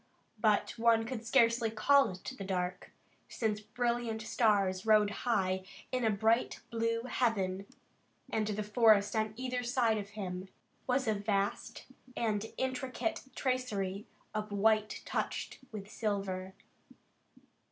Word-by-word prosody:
But 210 -2 +3
one 225 -1 +4
could 230 -1 -5
scarcely 230 -2 +4
call 275 +6 +4
it 185 0 -9 0.2
the - - -3
dark, 180 -1 -3 0.4
since 215 -2 -1
brilliant 235 0 -1
stars 205 -4 +2
rode 215 -1 +5 0.2
high 190 -4 +1 0.3
in 255 -1 0
a 225 - +4
bright 220 +3 +2
blue 230 0 0
heaven, 200 -6 0 0.6
and 215 -1 -1
the 210 0 -2
forest 210 -1 +4
on 215 -1 0
either 250 -1 -2
side 240 -3 +2
of 200 -1 -6
him 185 -2 -4 0.4
was 260 0 +1
a 220 - +3
vast 200 -1 -2 0.3
and 215 -2 0
intricate 260 +4 -2
tracery 210 -7 -1 0.3
of 215 -1 -3
white 215 +1 +2
touched - - -3
with 205 -3 -7
silver. 195 -3 -3
215 Hz, 125 wpm, -33 LUFS, 200-235 Hz, 0.6 s, rode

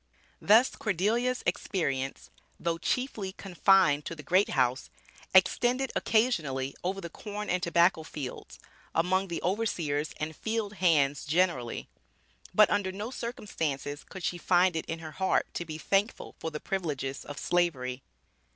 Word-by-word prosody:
Thus 225 +5 +5
Cordelia's 225 +6 0
experience, 135 -8 -2 0.3
though 170 -1 -1
chiefly 215 -3 -2
confined 185 -6 +3
to 165 - -5
the 150 - -10
"great 185 +5 +3
house," 130 0 +1 0.4
extended 245 +8 +3
occasionally 150 - +1
over 190 +2 -1
the 170 -3 -6
corn 210 +2 -5
and 180 0 +1
tobacco 170 0 +3
fields, 150 -4 -7 0.4
among 185 +3 +2
the 170 - -4
overseers 170 -7 -1
and 155 +1 -3
field 220 +1 -2
hands 145 -5 +3
generally. 155 -7 0 0.6
But 210 +2 +5
under 200 -2 +1
no 205 +5 -5
circumstances 160 - -4
could 190 -2 -10
she 175 +1 -1
find 180 0 +3
it 160 - -3
in 165 - -3
her 160 -1 -8
heart 190 +4 0
to 175 - -3
be 155 -1 -6
thankful 195 +7 0
for 160 - -3
the 150 -1 -6
privileges 145 -8 -3
of 145 - -8
Slavery. 135 -8 0
175 Hz, 140 wpm, -29 LUFS, 150-200 Hz, 0.6 s, Thus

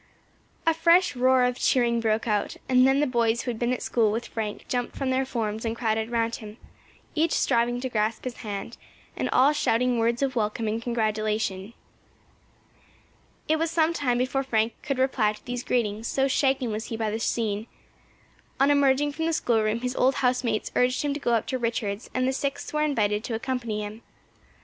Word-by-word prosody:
A 325 - +4
fresh 335 0 +4
roar 255 0 +4
of 250 0 0
cheering 235 -2 +2
broke 225 +1 0
out, 210 -2 -1
and 255 0 +5
then 270 +2 +3
the - - +3
boys 235 -3 +1
who 245 - -2
had 225 - -7
been 240 0 0
at 255 - -2
school 225 -3 +2
with 230 +3 -2
Frank 215 -2 -5
jumped 245 -1 -2
from 270 -1 -1
their 260 0 0
forms 220 -4 -3
and 225 -1 -2
crowded 220 -1 -1
round 230 -1 0
him, 215 0 -10 0.6
each 320 +1 +1
striving 240 -1 +1
to 260 - -2
grasp 220 -2 -1
his 255 -2 -5
hand, 205 +2 -6 0.4
and - - -2
all 275 +4 +4
shouting 250 -3 +1
words 235 +3 +1
of 270 -1 -1
welcome 220 0 -1
and 220 +2 -1
congratulation. 215 -3 -1 1.7
It 315 - +2
was 330 0 0
some 330 0 +2
time 255 -7 0
before 255 +2 0
Frank 230 -4 0
could 275 -3 -2
reply 255 -5 +2
to - - -16
these 245 0 -4
greetings, 225 -2 -1
so 270 0 +1
shaken 265 -3 +1
was 215 +1 -3
he 225 - -5
by 220 -1 -1
the 220 - -2
scene. 220 -1 -1 0.9
On 275 +2 +5
emerging 285 0 +3
from 320 +3 -2
the 330 - 0
schoolroom 225 -5 +1
his 250 0 -2
old 260 +1 +3
house 250 -1 +1
mates 220 -3 -1
urged 250 +2 +2
him 290 -1 0
to 290 - -4
go 240 -4 0
up 225 - 0
to 260 - -2
Richards', 225 -3 -2
and 255 0 +1
the 265 - +1
Sixth 280 +2 -3
were 300 - +1
invited 215 -8 +1
to 230 - -3
accompany 230 -3 -3
him. 210 +2 -8
240 Hz, 200 wpm, -26 LUFS, 220-265 Hz, 1.7 s, and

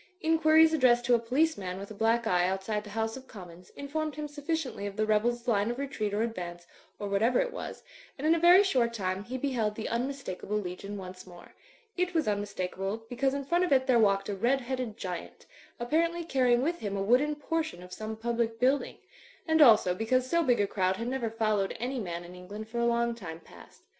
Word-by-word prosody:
Inquiries 320 -1 +5
addressed 245 -5 +4
to 245 - +3
a 235 - +5
police 265 +5 +1
man 185 -1 -4
with 200 +2 -8
a - - -5
black 225 +2 +1
eye 180 -4 +2
outside 195 +3 -2
the 210 - -11
House 225 +1 -2
of 265 0 -11
Commons 180 -3 -12
informed 300 +2 -3
him 300 0 -4
sufficiently 290 -7 -3
of 200 - -7
the 215 0 +1
rebels' 235 +3 +1
line 210 -2 +2
of 240 - -3
retreat 265 -7 -3
or 210 +2 0
advance, 175 -6 -5 0.3
or 205 - -4
whatever 220 +5 +2
it - - -1
was; - - -7 0.3
and 285 - -5
in 320 - +5
a 335 - +1
very 350 +4 +7
short 245 -11 +1
time 190 -2 -2
he 255 +3 -4
beheld 245 -6 -1
the 220 - -4
unmistakable 235 -5 -3
legion 200 +1 -5
once 185 -1 -9
more. 175 -1 -14 0.4
It 360 0 -1
was 320 - +2
tmmistakable, 205 +1 -3
because 265 +2 0
in 280 -1 -4
front 345 +5 +2
of 360 - -1
it 260 -1 +4
there 250 -3 +4
walked 195 -2 +3
a 205 - -2
red 245 +7 +1
headed 250 -3 -4
giant, 180 -3 -6 0.3
apparently 335 +7 0
carrying 255 -5 +2
with 340 +4 -1
him 200 -2 -3
a 195 - -1
wooden 260 +8 +3
portion 315 - -3
of 180 0 -11
some 220 0 -5
public 230 0 -1
building; 265 +3 +1 0.5
and 320 0 +3
also 215 -9 +7
because 250 +6 0
so 340 +4 +2
big 250 -6 +2
a 205 - +3
crowd 190 -1 0
had 230 - -4
never 255 -3 -2
followed 215 -3 0
any 255 +3 -2
man 175 -5 -4
in 175 +1 -11
England 200 +4 -8
for 235 +2 -4
a 235 - +2
long 235 0 +1
time 170 -8 -8
past. - - -17
235 Hz, 220 wpm, -29 LUFS, 200-275 Hz, 0.5 s, very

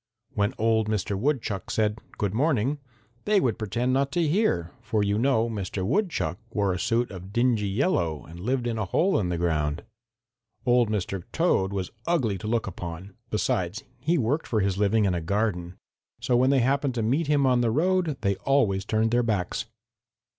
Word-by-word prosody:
When 100 -3 0
old 110 -1 +2
Mr. 105 -2 -1
Woodchuck 110 - -1
said 110 0 0 0.2
'good 100 -2 -1
morning,' 140 +1 +1 0.5
they 210 -1 +4
would 120 - 0
pretend 120 +4 -1
not 135 +1 +1
to 170 -2 +2
hear, 120 - +1
for 105 -2 0
you 100 +1 +1
know 120 -2 +2
Mr. 100 -4 -3
Woodchuck 135 - 0
wore 100 -4 0
a 90 - -3
suit 120 +2 0
of 95 0 -9
dingy 120 -2 +2
yellow 95 - 0
and 85 +1 -11
lived 125 +5 -1
in 115 -2 -1
a 110 - 0
hole 170 - +2
in 90 -4 -1
the 85 - -1
ground. 80 -2 0 0.8
Old 120 -2 +4
Mr. 95 -3 -2
Toad 130 - +2
was 95 -2 -3 0.2
ugly 125 - +1
to 105 - -6
look 115 +1 0
upon. 90 +1 -7 0.2
Besides, 100 -2 -1 0.2
he 160 +7 +1
worked 140 +5 0
for 110 -3 +1
his 95 -1 +1
living 105 +2 +2
in 95 - +2
a 85 - -1
garden. 90 -1 -1 0.4
So 120 +1 +1
when 130 +2 +4
they 135 -2 +4
happened 135 +1 +1
to 115 - 0
meet 140 +8 +1
him 145 -2 +3
on 125 -2 +3
the 120 - +2
road 165 +3 +1
they 100 -1 +1
always 100 -4 +1
turned 110 +1 +1
their 120 +1 +3
backs. 105 -6 -1
110 Hz, 190 wpm, -26 LUFS, 95-130 Hz, 0.8 s, they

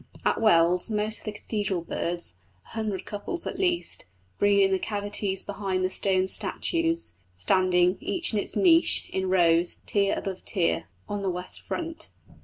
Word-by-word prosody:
At - - +1
Wells 180 -2 +4
most 215 0 +2
of - - -15
the 215 - -2
cathedral 205 -3 -3
birds 170 - -3 0.3
a - - -17
hundred 215 -4 -3
couples 215 +12 -3
at - - -4
least 350 - -1 0.3
breed 200 -1 +4
in 195 - +3
the 190 - +2
cavities 205 -2 -2
behind 195 -2 -2
the 185 - -1
stone 190 -1 +1
statues, 330 - -1 0.2
standing, 180 - +2
each 345 -8 +1
in 210 - +2
its - - +1
niche, 335 -2 +4
in 190 0 -1
rows, 170 -2 +3
tier 200 -1 +1
above 190 -2 -5
tier, 170 - 0 0.2
on 205 -1 -3
the 195 - -1
west 180 0 -5
front. 330 -1 -5
195 Hz, 165 wpm, -26 LUFS, 185-215 Hz, 0.3 s, Wells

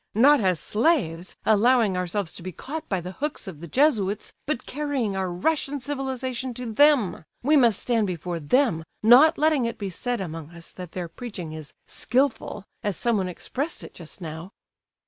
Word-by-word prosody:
Not 285 +6 +6
as 185 -4 +2
slaves, 210 - 0
allowing 220 -1 +4
ourselves 180 0 -2
to - - -10
be 185 +2 -5
caught 305 - -7
by 190 -3 0
the 180 +2 -6
hooks 290 +6 -4
of 160 -5 -8
the 170 - -7
Jesuits, 215 - +1
but 275 -4 -2
carrying 275 -7 -2
our 190 -1 -1
Russian 285 - 0
civilization 260 -2 -3
to 240 -2 -5
them, 285 - +4 0.2
we 300 +4 +4
must 235 -8 +5
stand 230 -4 +1
before 175 -1 -3
them, 170 - +2 0.2
not 265 +9 +7
letting 305 -4 +3
it 230 - -3
be 200 -2 -4
said 245 +6 -2
among 165 -4 -6
us 170 -1 -10
that 180 -2 -9
their 180 -2 -4
preaching 180 -4 -7
is 155 -2 -8
'skilful,' 250 -5 -1 0.2
as 205 -5 -2
someone 215 -6 +1
expressed 275 - -4
it - - -10
just 170 +2 -11
now." 165 +3 -7
220 Hz, 175 wpm, -25 LUFS, 180-265 Hz, 0.2 s, not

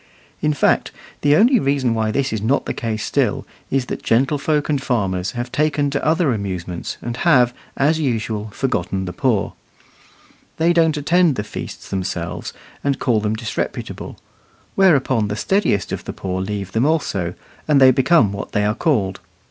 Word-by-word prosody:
In 150 - +2
fact, 145 - +2 0.3
the 145 0 +4
only 240 - +5
reason 135 - +1
why 110 -1 0
this 135 +2 -1
is 110 - -2
not 125 +7 +1
the - - -2
case 110 -2 -3
still - - 0 0.2
is 135 -2 0
that - - -5
gentlefolk 145 +5 +1
and 145 -3 0
farmers 95 -8 -1
have 120 0 -4
taken 145 0 +1
to 140 - -2
other 155 -3 +2
amusements, 90 -4 -4
and 120 0 -4
have, 125 -7 +4 0.2
as 155 +4 +2
usual, 110 -6 -1
forgotten 100 -5 -2
the 90 - -5
poor. 120 -7 0 1.0
They 165 +2 +3
don't 160 -3 +3
attend 165 +1 +3
the 105 - -2
feasts - - -8
themselves, 90 -3 -4 0.3
and 140 -1 +1
call 120 -5 +1
them 105 +1 -1
disreputable; 110 0 -5 0.6
whereupon 135 - +3
the 105 - -3
steadiest 150 - 0
of - - -4
the - - -5
poor 95 -1 -3
leave 100 0 -4
them 115 +7 +2
also, 95 - -1 0.3
and 150 -2 +4
they 130 -1 +8
become 130 - +3
what 100 - -6
they 105 0 +1
are 105 - +2
called. 110 - 0
125 Hz, 170 wpm, -20 LUFS, 105-150 Hz, 1.0 s, they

